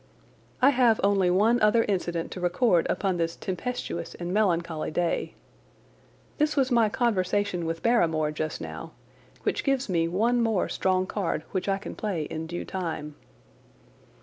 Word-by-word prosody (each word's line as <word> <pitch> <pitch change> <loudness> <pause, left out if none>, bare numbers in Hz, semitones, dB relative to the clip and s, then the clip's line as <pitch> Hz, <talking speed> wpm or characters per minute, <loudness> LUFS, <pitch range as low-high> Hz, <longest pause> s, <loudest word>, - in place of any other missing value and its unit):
I 275 - +8
have 245 -4 +3
only 195 -2 +3
one 215 +6 +3
other 215 +2 +4
incident 175 -5 -2
to - - -6
record 180 +1 +2
upon 190 -2 0
this 165 0 -1
tempestuous 190 -3 -4
and 175 +1 -4
melancholy 170 -6 0
day. 170 +2 -1 1.0
This 300 0 +2
was 270 -2 +2
my 230 -3 +4
conversation 205 -5 0
with 165 0 -4
Barrymore 160 -10 +2
just 155 -2 -4
now, 80 -1 -7 0.5
which - - -1
gives 270 -4 0
me 165 -2 +1
one 230 +8 +1
more 220 -5 +1
strong 185 0 +1
card 185 -5 -2
which 185 0 -2
I 195 - +2
can 200 - -7
play 195 -7 -2
in 160 +2 -5
due 175 +1 -5
time. 160 -5 -4
185 Hz, 150 wpm, -27 LUFS, 170-225 Hz, 1.0 s, I